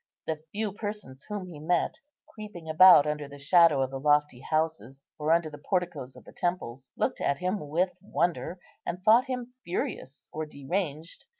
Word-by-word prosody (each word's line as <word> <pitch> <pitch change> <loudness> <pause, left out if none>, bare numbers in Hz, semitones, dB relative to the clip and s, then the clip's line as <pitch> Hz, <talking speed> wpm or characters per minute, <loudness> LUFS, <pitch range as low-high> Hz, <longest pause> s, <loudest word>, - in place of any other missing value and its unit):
The 155 -1 -3
few 210 0 -2
persons 205 -11 -7
whom 205 -3 -4
he 170 -5 -10
met, 175 - 0 0.3
creeping 210 -7 -10
about 160 -1 +8
under 150 -1 -2
the 145 0 -11
shadow 150 -1 +5
of 130 - -3
the 135 - -4
lofty 150 -2 +2
houses, 155 -3 -2
or 150 +1 +1
under 165 -2 +2
the 145 - -10
porticoes 160 -6 -2
of - - -14
the - - -15
temples, 135 -8 -3
looked - - -1
at 140 - +1
him 180 -4 -3
with 180 +5 +1
wonder, 175 +1 -1 0.2
and 180 +2 -5
thought 225 +4 +6
him 250 -2 -5
furious 145 -5 -4
or 155 0 -4
deranged. 155 +2 -4
160 Hz, 175 wpm, -28 LUFS, 145-185 Hz, 0.3 s, about